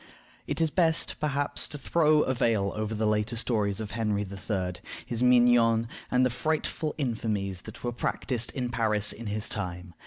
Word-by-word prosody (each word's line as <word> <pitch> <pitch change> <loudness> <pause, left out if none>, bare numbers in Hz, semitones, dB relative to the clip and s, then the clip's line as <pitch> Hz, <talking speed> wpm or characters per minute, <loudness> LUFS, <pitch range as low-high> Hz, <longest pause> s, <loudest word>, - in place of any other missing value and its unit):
It - - -2
is 160 -2 +2
best, 165 -2 +2
perhaps, 145 -1 +1
to 150 - -5
throw 155 +1 +3
a 130 - 0
veil 115 -6 +1
over 110 +1 -2
the 110 +1 0
later 105 +2 0
stories 105 -4 0
of 110 -2 -5
Henry 105 -2 -1
III., 95 -1 -3 0.3
his 120 -1 -3
mignons, 120 -2 +5 0.2
and 125 0 +3
the 125 - +1
frightful 155 +3 -1
infamies 110 - -2
that 110 - -10
were 120 - -1
practiced 120 0 -2
in 125 -3 -2
Paris 110 -3 +1
in 115 0 -8
his 105 +1 -2
time. 90 -3 -4
115 Hz, 175 wpm, -28 LUFS, 105-125 Hz, 0.3 s, mignons